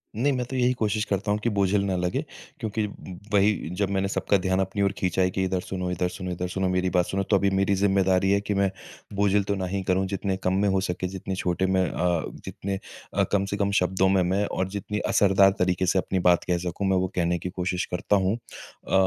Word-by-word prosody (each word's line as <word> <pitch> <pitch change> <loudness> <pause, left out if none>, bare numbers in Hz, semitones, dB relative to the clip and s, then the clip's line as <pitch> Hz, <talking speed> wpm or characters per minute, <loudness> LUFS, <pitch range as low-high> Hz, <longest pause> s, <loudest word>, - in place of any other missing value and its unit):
नहीं, 130 +6 +2
मैं 125 -1 -1
तो 130 - -6
यही 125 0 +3
कोशिश 110 -3 0
करता 100 +1 -1
हूँ 105 - +1
कि 120 - +2
बोझिल 100 -1 +1
ना 95 -2 0
लगे, 90 0 -1 0.4
क्योंकि 110 0 -2
ब 95 -3 -10
वही, 100 -3 +2
जब 95 +2 -1
मैंने 100 0 0
सबका 100 0 +1
ध्यान 95 0 0
अपनी 95 +2 -1
ओर 100 -1 +3
खींचा 95 0 0
है 90 - +3
कि 95 - -1
इधर 95 0 0
सुनो, 90 0 -4
इधर 90 0 0
सुनो, 90 0 -6
इधर 90 +1 -3
सुनो, 95 +1 -1
मेरी 90 0 +1
बात 90 0 +2
सुनो, 95 +2 -1
तो 100 - +2
अभी 100 +1 +2
मेरी 95 +1 +2
ज़िम्मेदारी 95 -1 +2
है 100 - +4
कि 105 0 -2
मैं 100 0 +2 0.5
बोझिल 100 0 +3
तो 100 +1 -1
ना 95 -1 -2
ही 95 +2 -2
करूँ। 95 +1 +2
जितने 95 0 -2
कम 95 - +1
में 105 - +2
हो 95 0 +2
सके, 90 0 -2
जितने 95 0 -5
छोटे 90 0 0
में 95 0 +2
अ, 90 -2 0 0.2
जितने 95 0 -4 0.3
अ, - - +2
कम 100 -1 +2
से 100 +1 -3
कम 100 0 +1
शब्दों 95 +1 +2
में 95 -1 +3
मैं, 95 +3 +1
और 95 - -2
जितनी 105 +1 -4
असरदार 95 -1 +5
तरीके 90 0 +1
से 95 +1 +2
अपनी 95 0 -1
बात 85 - +3
कह 90 - +3
सकूँ, 90 +3 -3
मैं 95 -1 +3
वो 95 0 +1
कहने 85 0 +1
की 90 - -4
कोशिश 90 0 -2
करता 90 +3 +1
हूँ। 95 +1 +2 0.5
अ, - - -4
95 Hz, 245 wpm, -25 LUFS, 90-100 Hz, 0.5 s, असरदार